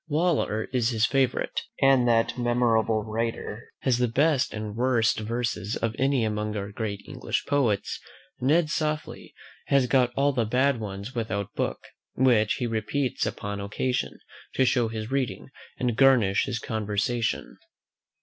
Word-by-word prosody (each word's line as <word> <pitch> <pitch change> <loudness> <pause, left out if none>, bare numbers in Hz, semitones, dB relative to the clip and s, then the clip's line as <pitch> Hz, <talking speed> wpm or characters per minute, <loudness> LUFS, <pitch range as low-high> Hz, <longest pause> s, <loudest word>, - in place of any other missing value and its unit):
Waller 155 -9 +1
is 120 -2 +2
his 115 -2 +2
favourite: 135 -3 0 0.2
and 135 -3 +4
as 115 -1 +3
that - - -10
admirable 115 -2 +2
writer 115 0 -4
has 125 -3 +1
the 125 - +3
best 140 +3 +2
and 105 -1 -5
worst 120 -2 +2
verses 115 -2 -2
of 115 -1 -2
any 135 -2 +2
among 105 0 -2
our 100 0 -4
great 105 -2 -4
English - - -3
poets, 120 -8 0 0.4
Ned 150 +5 +2
Softly 155 -2 -3 0.3
has 140 -2 +4
got 125 -1 +3
all 140 +1 +2
the 120 -3 +1
bad 130 +3 +2
ones 100 +2 -6
without 100 -5 -3
book, - - -2 0.3
which 120 -5 +3
he 125 - -2
repeats 120 +4 -1
upon 100 0 -4
occasion, 125 +5 -2 0.4
to 130 - +3
show 120 -2 +2
his 110 +1 -5
reading, 135 -1 -2 0.3
and 125 -3 0
garnish 120 -7 +4
his 120 - -2
conversation. 110 +1 -2
120 Hz, 150 wpm, -26 LUFS, 110-130 Hz, 0.4 s, and